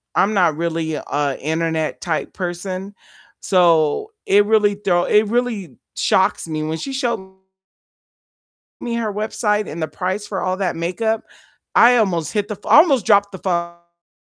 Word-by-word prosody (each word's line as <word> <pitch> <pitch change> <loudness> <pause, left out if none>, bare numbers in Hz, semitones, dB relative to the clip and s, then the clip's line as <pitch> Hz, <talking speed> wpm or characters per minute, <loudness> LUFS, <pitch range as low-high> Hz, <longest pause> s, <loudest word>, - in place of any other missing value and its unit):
I'm 205 +3 +2
not 175 -6 +3
really 165 -1 -2
a 145 -2 -2
internet 160 +1 -2
type 165 -4 -3
person, 185 +2 -5 0.5
so 175 - +2
it 205 +1 +4
really 210 -1 +3
throw 185 -4 +1
it 210 +1 +3
really 220 - -2 0.2
shocks - - +1
me, 155 -1 -3
when 160 +1 -3
she 270 - -6
showed 235 -8 -3 1.5
me 235 - -4
her 225 -3 -2
website 210 0 -1
and 160 +2 -6
the 160 - -1
price 190 +6 -3
for 195 -3 -4
all 185 0 -1
that 190 -4 -2
makeup, 215 +7 -1 0.5
I 245 +1 +6
almost 175 -9 0
hit 205 -2 -1
the 210 - -4
fl - - -11
I - - +6
almost 275 - +4
dropped 200 -1 +4
the 190 - -7
phone. 170 -1 -5
190 Hz, 160 wpm, -20 LUFS, 170-210 Hz, 1.5 s, I